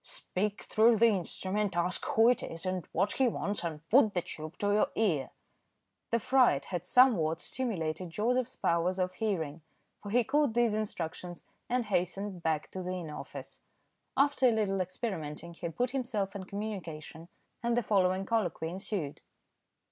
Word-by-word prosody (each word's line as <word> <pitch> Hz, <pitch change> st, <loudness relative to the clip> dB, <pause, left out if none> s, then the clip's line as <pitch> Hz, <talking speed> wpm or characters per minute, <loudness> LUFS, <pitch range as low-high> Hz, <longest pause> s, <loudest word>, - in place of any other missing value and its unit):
"Speak 210 Hz, -, -3 dB
through 225 Hz, +1 st, +4 dB
the 230 Hz, +2 st, +6 dB
instrument, 195 Hz, 0 st, -1 dB
ask 175 Hz, +1 st, +1 dB
who 225 Hz, +1 st, +4 dB
it 250 Hz, -, +2 dB
is, 165 Hz, +2 st, -6 dB
and 185 Hz, -2 st, -2 dB
what 195 Hz, +4 st, +1 dB
he 265 Hz, -, +3 dB
wants, 205 Hz, -4 st, -2 dB
and 160 Hz, -2 st, -5 dB
put 220 Hz, -5 st, +5 dB
the 175 Hz, -, +1 dB
tube 155 Hz, +1 st, -8 dB
to 205 Hz, 0 st, +1 dB
your 215 Hz, +6 st, +4 dB
ear." 170 Hz, -12 st, +1 dB, 0.8 s
The 235 Hz, -, +2 dB
fright 235 Hz, -, +3 dB
had 175 Hz, +1 st, -4 dB
somewhat 180 Hz, -12 st, +5 dB
stimulated 180 Hz, -8 st, -2 dB
Joseph's 245 Hz, +7 st, 0 dB
powers 170 Hz, +2 st, +1 dB
of 185 Hz, -1 st, 0 dB
hearing, 170 Hz, -7 st, -2 dB, 0.4 s
for 205 Hz, -, -7 dB
he 240 Hz, +3 st, +3 dB
caught 280 Hz, -2 st, +1 dB
these 240 Hz, -2 st, +3 dB
instructions 180 Hz, -4 st, -4 dB, 0.2 s
and 245 Hz, -1 st, +1 dB
hastened 195 Hz, -1 st, -1 dB
back 160 Hz, -2 st, -1 dB
to 185 Hz, -, -5 dB
the 180 Hz, 0 st, -3 dB
inner 165 Hz, -5 st, -5 dB
office. -, -, -9 dB, 0.6 s
After 275 Hz, -1 st, +4 dB
a -, -, +5 dB
little 200 Hz, -4 st, +1 dB
experimenting 170 Hz, -4 st, -4 dB
he 170 Hz, 0 st, -5 dB
put 245 Hz, +9 st, -1 dB
himself 235 Hz, -7 st, -2 dB
in 190 Hz, -2 st, -5 dB
communication, 170 Hz, -6 st, -6 dB, 0.3 s
and 235 Hz, 0 st, +1 dB
the 240 Hz, -, +2 dB
following 190 Hz, -2 st, +2 dB
colloquy 185 Hz, -7 st, 0 dB
ensued. 180 Hz, -4 st, -4 dB
195 Hz, 165 wpm, -31 LUFS, 170-225 Hz, 0.8 s, the